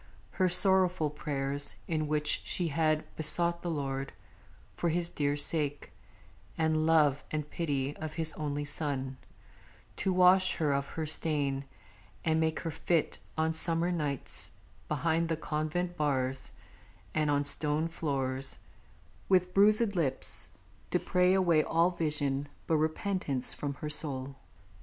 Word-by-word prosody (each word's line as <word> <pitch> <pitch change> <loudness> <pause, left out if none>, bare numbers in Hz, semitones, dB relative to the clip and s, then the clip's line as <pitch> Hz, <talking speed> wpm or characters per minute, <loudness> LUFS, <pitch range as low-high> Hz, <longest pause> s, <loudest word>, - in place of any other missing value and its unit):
her 185 -1 +1
sorrowful 180 -3 +5
prayers, 145 -1 -3
in 155 -2 -1
which 150 0 +2
She 175 -2 0
had 155 +1 +1
besought 170 +2 +3
the 175 - -3
Lord, 135 -3 -3 0.6
for 170 - 0
His 170 +1 0
dear 145 -3 -1
sake, 145 -1 +1 0.7
And 160 -1 +1
love 150 -4 +3
and 150 -1 -3
pity 145 -4 -2
of 155 -1 -6
His 160 -1 -1
Only 145 -1 -3
Son, 135 -3 -3 0.8
To 190 - 0
wash 185 +1 +5
her 150 -3 +1
of 140 0 -1
her 160 +2 -4
stain, 145 -3 +1 0.6
and 160 -1 +2
make 160 0 0
her 165 - -3
fit 160 +1 -1 0.2
On 160 0 +1
summer 165 +1 +1
nights, 150 -6 -2 0.4
behind 165 0 0
the 160 - 0
convent 160 +3 -2
bars 135 -3 0 0.6
And 155 -1 +1
on 145 0 +2
stone 150 +2 +2
floors, 135 -5 -2 0.7
with 180 -1 +3
bruisèd 210 +2 +4
lips, 145 -8 -3 0.4
to - - +2
pray 180 +1 +2
Away 175 -5 +4
all 170 +2 +2
vision 145 -4 -1 0.2
but 160 - +2
repentance 155 -3 0
from 140 -1 -4
her 150 +3 -5
soul. 135 -3 -1
155 Hz, 135 wpm, -30 LUFS, 145-170 Hz, 0.8 s, sorrowful